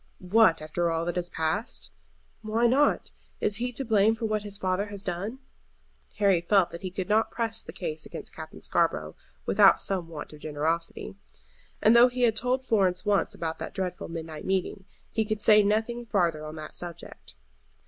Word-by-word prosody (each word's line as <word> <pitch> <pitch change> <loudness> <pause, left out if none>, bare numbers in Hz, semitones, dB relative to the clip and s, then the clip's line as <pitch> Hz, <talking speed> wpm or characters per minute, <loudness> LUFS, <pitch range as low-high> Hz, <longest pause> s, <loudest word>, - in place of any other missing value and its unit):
"What, 180 -4 +3
after 170 +2 -1
all 165 0 0
that 175 - -2
has 175 -1 -1
passed?" 160 -2 -2 0.5
"Why 220 +2 0
not? 270 +5 +2 0.3
Is 205 -1 +1
he 245 +2 -2
to 270 +3 -3
blame 220 -1 +3
for 225 0 -4
what 215 -1 0
his 205 -1 -5
father 190 +1 -1
has 205 -1 -5
done?" 195 +7 -3 0.8
Harry 195 -5 +3
felt 185 +1 +3
that 170 - -8
he 185 - -4
could 185 0 -4
not 215 +1 +2
press 225 -1 -2
the - - -9
case 465 -2 -5
against - - -8
Captain - - -9
Scarborough - - 0 0.3
without 195 -1 +6
some 185 -4 -1
want 155 -2 -8
of 150 - -12
generosity. 155 +3 -2 0.7
And 220 +2 +6
though 240 +1 +8
he 250 0 -2
had 225 -3 +4
told 255 +3 -1
Florence 190 -5 +1
once 205 -1 +1
about 160 -1 -3
that - - -6
dreadful 180 -2 -3
midnight 160 -2 -6
meeting, 190 0 -2 0.3
he 220 - +1
could 215 -1 -3
say 210 -1 +7
nothing 220 +3 0
farther 170 -7 +1
on 155 0 -7
that 155 -1 -8
subject. 175 -2 -8
195 Hz, 185 wpm, -27 LUFS, 170-220 Hz, 0.8 s, though